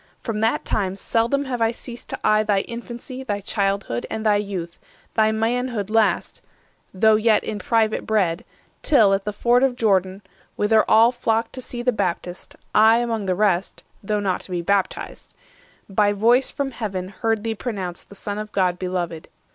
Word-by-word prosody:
From 225 -3 -4
that 225 +1 +1
time 190 -2 -1
seldom 235 +7 0
have 250 -3 -3
I 225 - +4
ceased 240 +1 -9
to - - -5
eye 215 0 +4
Thy 205 -2 +1
infancy, 240 +3 -8
thy 205 -5 -2
childhood, 195 - -1
and 220 0 -4
thy 210 -1 +4
youth, 190 -5 -5 0.3
Thy 220 -1 +3
manhood 225 -1 -1
last, 225 -1 +1 0.5
though 215 +3 +4
yet 220 -1 +3
in 210 - -4
private 220 0 0
bred; 195 -3 +1 0.4
Till, 220 -10 +4
at 195 0 -1
the 210 - -1
ford 240 +4 +2
of 265 -2 +2
Jordan, 195 -4 +1 0.3
whither 215 +1 +4
all 225 +2 +6
510 240 0 -24
Flocked 225 0 +1 0.2
to 240 -1 -4
the 250 - +3
Baptist, 180 -4 -4 0.2
I 220 +2 +6
among 230 -4 -2
the 185 - +1
rest 195 -2 0 0.2
(Though 210 +1 -1
not 195 -3 -1
to - - -11
be 175 -2 -2
baptized), 200 +1 -2 0.5
by 205 +1 +2
voice 235 +6 +3
from 275 -1 -3
Heaven 195 -6 -4
Heard 220 +2 -1
thee 225 -1 -1
pronounced 195 -6 -5
the 200 - -12
Son 205 +1 -5
of 215 0 -6
God 180 -2 +1
beloved. 175 -3 -3
215 Hz, 180 wpm, -22 LUFS, 195-230 Hz, 0.5 s, all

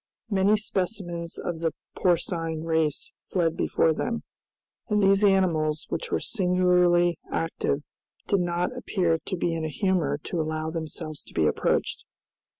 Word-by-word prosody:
Many 200 +2 +4
specimens 180 -4 -3
of 170 -2 -4
the 165 -1 0 0.2
porcine 165 -2 0
race 160 - 0
fled 165 -3 +1
before 160 - +2
them, 230 +8 -2 0.7
and 210 -1 +3
these 195 +1 +4
animals, 165 -6 +2
which - - -3
were - - +2
singularly 180 -3 +3
active, 160 -3 -1 0.4
did 200 - +2
not 175 +6 -1
appear 175 -9 0
to 185 - -3
be 170 0 0
in 165 -1 -2
a 155 - -1
humor 170 -5 +1
to 170 - -2
allow 155 0 -2
themselves 160 -1 -5
to - - -16
be 80 - +3
approached. - - 0
175 Hz, 145 wpm, -26 LUFS, 160-190 Hz, 0.7 s, Many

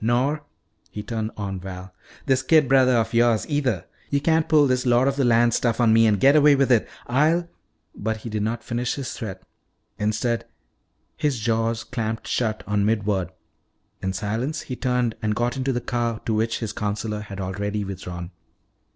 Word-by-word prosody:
Nor," 130 +6 +1 0.5
he 105 - -6
turned 110 0 -3
on 100 -2 -4
Val, 90 0 -8 0.3
"this 130 -1 +2
kid 150 +2 +4
brother 130 -1 +5
of 115 -1 +1
yours, 115 -2 +3
either. 135 - 0 0.2
You 140 - +1
can't 160 +2 +1
pull 150 -2 +5
this 130 -2 +1
lord 125 +1 +3
of 140 - +1
the 140 - +1
land 120 -1 +4
stuff 120 -1 0
on 115 -2 +4
me 115 0 +5
and 105 -2 +2
get 140 +6 +5
away 150 -1 +6
with 135 -1 +2
it. 115 -3 +3 0.2
I'll 160 +7 +2 0.3
" - - -47
But 110 +1 -2
he - - -3
did 105 -1 -2
not 115 +2 -2
finish 120 +1 -2
his 135 -3 -5
threat. 95 -6 -7 0.6
Instead, 110 +3 0 0.7
his 150 -5 0
jaws 115 +1 0
clamped 115 -3 -4
shut 110 -3 -1
on 105 0 0
mid 105 -1 +1
word. 95 -4 0 0.7
In 95 - -1
silence 115 - -2
he 125 - -6
turned 125 -3 0
and 105 -1 0
got 120 +1 0
into 135 0 -1
the 120 - -1
car 120 -2 -2
to 115 - 0
which 110 +2 0
his 110 - -3
counselor 105 +1 -3
had 100 -2 -8
already 100 +2 -3
withdrawn. 90 -2 -6
115 Hz, 190 wpm, -23 LUFS, 105-130 Hz, 0.7 s, away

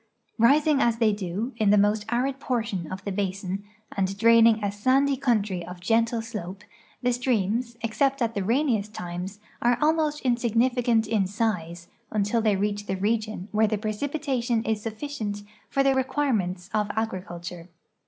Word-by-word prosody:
Rising 285 +4 +4
as 235 -1 +2
they 225 -2 +3
do, 205 +5 -3
in 215 -3 +2
the 210 - +6
most 210 +1 +2
arid 260 +3 0
portion 225 - -2
of 190 +1 -6
the 200 - -2
basin, 195 0 -3 0.3
and 195 0 -1
draining 230 0 +5
a 200 - 0
sand}" 265 +6 +2
country 210 -8 +1
of 180 +1 -9
gentle 225 +4 +1
slope, 205 -4 -7 0.4
the 245 0 +2
streams, 235 -1 0
except 270 +5 +1
at 230 -2 0
the 200 - -2
rainiest 225 -2 0
times, 180 +3 -5 0.2
are 240 0 +3
almost 305 -1 +1
insignificant 240 -1 +2
in 210 -3 +1
size 180 -5 -2 0.2
until 210 +2 +1
they 215 -2 +2
reach 205 +1 -2
the 190 - -1
region 215 -1 -1
where 215 +1 +3
the 215 0 0
precipitation 240 +1 -1
is 220 -2 -1
sufficient 220 -2 -4 0.3
for 275 - +2
the 275 0 +4
re 265 0 +2
quirements 205 -11 -1
of 210 -1 +1
agriculture. 180 -5 -5
220 Hz, 160 wpm, -26 LUFS, 200-245 Hz, 0.4 s, the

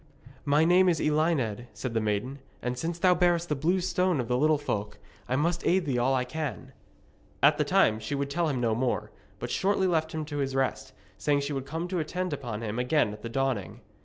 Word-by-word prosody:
'My 145 +2 +4
name 180 +2 +5
is 165 -3 +1
Elined,' 150 -8 0
said 130 -3 -5
the 115 - +1
maiden, 110 +6 -2 0.2
'and 125 0 -1
since 165 +6 -3
thou 180 0 +4
bearest 175 -1 +2
the 150 - +1
Blue 170 +7 +1
Stone 180 -2 +1
of 120 - -2
the 125 - +1
Little 155 +4 +3
Folk, 105 -8 -3 0.3
I 130 - +1
must 170 +5 0
aid 185 0 +2
thee 130 -4 0
all 130 +2 +2
I 125 -1 0
can.' 155 +1 -5 0.7
At - - +5
that - - +1
time 110 0 +3
she 110 +6 -3
would 140 0 -2
tell 165 +2 +1
him 135 -4 -1
no 115 -2 +1
more, 125 +2 -1 0.3
but - - -5
shortly 195 0 +1
left 160 -3 +1
him 155 -1 -3
to 145 -1 -5
his 135 -1 -1
rest, 135 -1 -1 0.3
saying 145 -1 +2
she 140 +1 -3
would 135 -1 -4
come 165 +3 -3
to 180 -1 -2
attend 180 +2 -2
upon 120 -6 -5
him 110 +2 -3
again 125 -3 +2
at 105 - -11
the 115 - -5
dawning. 130 -5 -2
145 Hz, 225 wpm, -28 LUFS, 125-170 Hz, 0.7 s, name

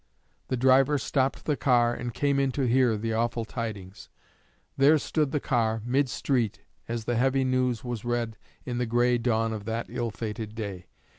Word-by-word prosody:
_' - - -41
The 130 - -1
driver 130 +3 +4
stopped 135 0 -1
the 150 - +1
car, 120 -3 +3
and 120 0 -4
came 140 +3 +1
in 135 -1 +1
to 140 - -1
hear 125 -2 +3
the 115 +1 -2
awful 115 0 -1
tidings. 105 -5 -6 0.7
There 145 +3 +5
stood 150 0 0
the 150 - 0
car, 115 -5 0
mid 130 +2 +1
street, 120 -4 -1 0.3
as 115 -1 -4
the 120 -1 0
heavy 135 +2 +2
news 130 -2 0
was 120 -4 -4
read 120 -2 -2 0.3
in 125 -1 -3
the 125 - 0
gray 120 +1 +2
dawn 115 -1 +1
of 105 -2 -6
that 115 +1 -2
ill 120 -1 -2
fated 110 0 -5
day. 100 -5 -6
120 Hz, 190 wpm, -27 LUFS, 115-130 Hz, 0.7 s, There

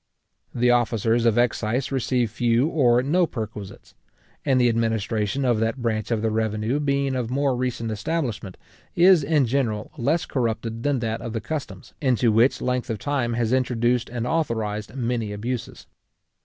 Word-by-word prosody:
The 125 0 +3
officers 120 -1 +2
of 115 0 +2
excise 120 +2 0
receive 125 -3 0
few 120 +2 +2
or 125 -7 +3
no 170 +5 +2
perquisites; 105 -6 -7 0.5
and 135 -3 +2
the 125 - +4
administration 115 +2 0
of 120 -3 +2
that 115 +3 -1
branch 110 -3 -2
of 115 -2 -1
the 110 - +1
revenue 110 +4 -1
being 140 -2 0
of 125 -3 -2
more 135 0 +1
recent 120 -2 -2
establishment, 115 - -3 0.4
is 175 -2 +6
in 145 -1 +2
general 115 -4 -1
less 150 +8 +1
corrupted 115 -2 -2
than 140 -2 0
that 115 -1 -2
of 115 - -5
the 115 - -1
customs, 115 -5 -6
into 125 -4 +2
which 115 +5 +3
length 125 0 -1
of 110 - -2
time 125 0 -1
has 115 0 0
introduced 125 -1 +1
and 120 -1 -3
authorised 110 -7 -2
many 120 -4 -2
abuses. 115 +4 -5
120 Hz, 160 wpm, -24 LUFS, 110-130 Hz, 0.5 s, is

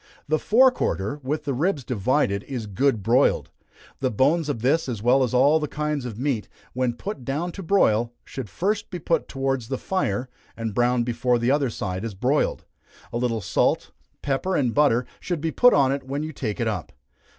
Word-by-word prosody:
The 155 +1 +1
fore 255 +4 +5
quarter, 110 - -2
with 145 +4 -2
the 140 - -1
ribs 150 +2 0
divided, 115 -2 0
is 125 -5 -4
good 110 +2 0
broiled. 120 +6 +2 0.5
The 130 - +1
bones 145 +8 +2
of 115 -6 -3
this, 150 +3 +2
as 110 -4 -4
well 125 +3 +4
as 125 -3 +1
all 140 +5 +4
kinds 150 -2 -2
of 115 -4 -6
meat, 130 -4 -1 0.2
when 125 -1 0
put 150 - -6
down 150 +8 -2
to 195 - -8
broil, 120 - +2
should 130 -6 -7
first 200 - -1
be 180 - -5
put 165 -1 0
towards 135 -3 -2
the 130 +1 -2
fire, 125 - -1 0.3
and 115 -2 -3
browned 120 +1 +2
before 120 +1 +1
the 120 +2 +1
other 140 -2 +2
side 95 -3 -4
is 115 -4 -5
broiled. 130 +9 0 0.5
A - - 0
little 115 -3 0
salt, - - +1 0.3
pepper, 145 +7 0
and 125 -5 +1
butter, 135 -5 +3
should 175 -3 -3
be 160 +2 -2
put 245 +7 +6
on 135 -2 +4
it 140 - -1
when 140 +3 -4
you 155 0 -5
take 110 -7 -4
it 115 - 0
up. 105 -7 -3
130 Hz, 195 wpm, -24 LUFS, 115-150 Hz, 0.5 s, put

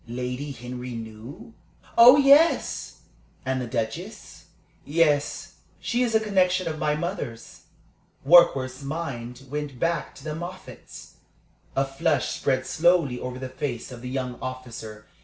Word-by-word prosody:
"Lady 125 +4 -4
Henry 125 -1 -7
knew?" 115 - -9 0.4
"Oh 245 +4 +9
yes!" 290 +4 +3 0.4
"And 130 0 -1
the 125 - -4
Duchess?" 115 -1 -5 0.4
"Yes. 150 -1 0 0.2
She 240 - -1
is 235 -3 +1
a - - +6
connection 185 -4 +1
of 155 -1 -4
my 150 -1 +1
mother's." 140 -8 -6 0.6
Warkworth's 135 -5 +5
mind 135 -4 -5
went 145 -4 -4
back 165 +1 -1
to 135 - -13
the 155 -1 -4
Moffatts. 175 +3 -9 0.6
A 135 - +2
flush 145 +2 0
spread 130 -1 -1
slowly 165 -7 +2
over 125 0 -5
the 130 0 -5
face 130 -2 -5
of 120 -2 -9
the 125 - -6
young 125 -1 -4
officer. 115 -4 -7
135 Hz, 135 wpm, -25 LUFS, 125-165 Hz, 0.6 s, Oh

